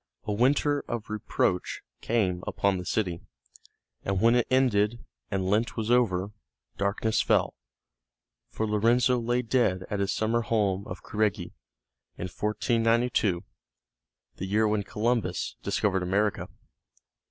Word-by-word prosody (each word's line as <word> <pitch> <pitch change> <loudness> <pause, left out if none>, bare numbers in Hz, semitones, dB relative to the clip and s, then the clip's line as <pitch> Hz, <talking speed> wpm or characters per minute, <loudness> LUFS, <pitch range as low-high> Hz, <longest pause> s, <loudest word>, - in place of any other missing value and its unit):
A 105 - -2
winter 145 +6 +2
of 115 -2 -5
reproach 100 -3 -1 0.2
came 95 -6 0
upon 100 -2 +1
the 90 - -7
city, 90 -6 -1 0.8
and 100 -1 -1
when 115 +3 +5
it 120 -1 +2
ended, 120 -3 +2 0.2
and 95 -1 -1
Lent 110 +6 0
was 110 +1 -1
over, 100 -6 +2 0.4
darkness 100 +3 0
fell, - - +2 1.0
for 110 - -2
Lorenzo 120 +4 +3
lay 120 +2 0
dead 115 -7 +1
at 105 - -1
his 100 0 0
summer 115 +2 +1
home 105 -3 0
of 90 - -8
Careggi, 105 -2 -1 0.6
in - - -5
1492 115 -1 +1 0.9
the 95 - -4
year 110 +3 +2
when 105 0 +1
Columbus 105 -2 -1
discovered 95 -2 0
America. 100 +3 0
105 Hz, 125 wpm, -27 LUFS, 100-115 Hz, 1.0 s, when